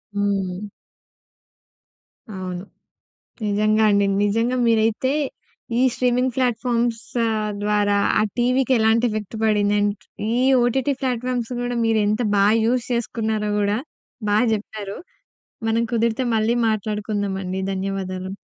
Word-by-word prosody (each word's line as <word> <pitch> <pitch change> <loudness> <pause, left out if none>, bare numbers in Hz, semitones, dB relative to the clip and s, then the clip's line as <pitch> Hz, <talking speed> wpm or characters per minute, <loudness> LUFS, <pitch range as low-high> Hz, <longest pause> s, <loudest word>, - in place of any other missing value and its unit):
హ్మ్. 200 -1 -1 1.6
అవును. 185 -3 -5 0.8
నిజంగా 215 +1 +2
అండి. 200 0 +3 0.2
నిజంగా 230 +5 +1
మీరైతే 225 +4 +2 0.7
ఈ - - +3
స్ట్రీమింగ్ 250 0 +1
ఫ్లాట్‍ఫామ్స్ 240 -2 0 0.6
ద్వారా 205 -1 +2 0.2
ఆ - - +3 0.2
టీవీకి 255 +2 +2
ఎలాంటి 220 +2 +3
ఎఫెక్ట్ 215 0 -5
పడింది? 210 -1 +2
అండ్ 205 0 +1 0.4
ఈ - - +1 0.3
ఓటీటీ 265 +4 +1
ఫ్లాట్‍ఫామ్స్ 250 -2 -2
గూడా 245 0 -2
మీరెంత 215 0 +2
బా 200 - +4 0.2
యూజ్ 240 +1 +1
చేసుకున్నారో 220 -2 -1
గూడా 205 +1 +1 0.5
బా 205 - +3 0.2
చెప్పారు. 210 -1 -4 0.7
మనం 225 +1 +2
కుదిరితే 235 +2 +1
మళ్ళీ 220 +2 +2
మాట్లాడుకుందామండి. 205 -3 -2
ధన్యవాదాలు. 190 -1 -4
215 Hz, 105 wpm, -22 LUFS, 205-235 Hz, 1.6 s, బా